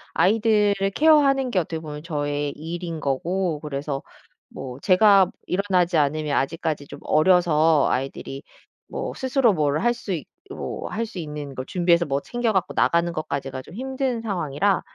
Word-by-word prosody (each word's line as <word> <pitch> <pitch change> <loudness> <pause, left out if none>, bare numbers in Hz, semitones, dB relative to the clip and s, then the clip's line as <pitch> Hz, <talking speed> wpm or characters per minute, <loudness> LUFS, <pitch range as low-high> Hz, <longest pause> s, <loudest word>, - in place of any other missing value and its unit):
아이들을 210 -1 +3
케어하는 280 -4 +4
게 190 - +2
어떻게 165 -1 -3
보면 150 -2 -7
저의 145 -2 -2
일인 165 +1 -5
거고 165 +4 -1
그래서 140 -2 -4 0.5
뭐 130 0 -8
제가 195 +1 +5 0.2
일어나지 180 -3 +1
않으면 150 0 +1
아직까지 150 0 -2
좀 - - -10
어려서 160 -3 +4
아이들이 135 +1 -4 0.5
뭐 - - -4
스스로 260 -4 +2
뭘 150 -2 +1
할 240 0 +3
수 225 -5 -5
있 160 - -4 0.3
뭐 - - -5
할 230 +2 -2
수 215 -4 -8
있는 150 -3 -6
걸 130 - -5
준비해서 175 -1 +2
뭐 140 0 -1
챙겨 240 -2 -1
갖고 190 -3 0
나가는 170 0 +2
것까지가 135 -4 -4
좀 155 - -14
힘든 260 -1 -2
상황이라 190 -2 0
170 Hz, 330 characters per minute, -23 LUFS, 150-205 Hz, 0.5 s, 제가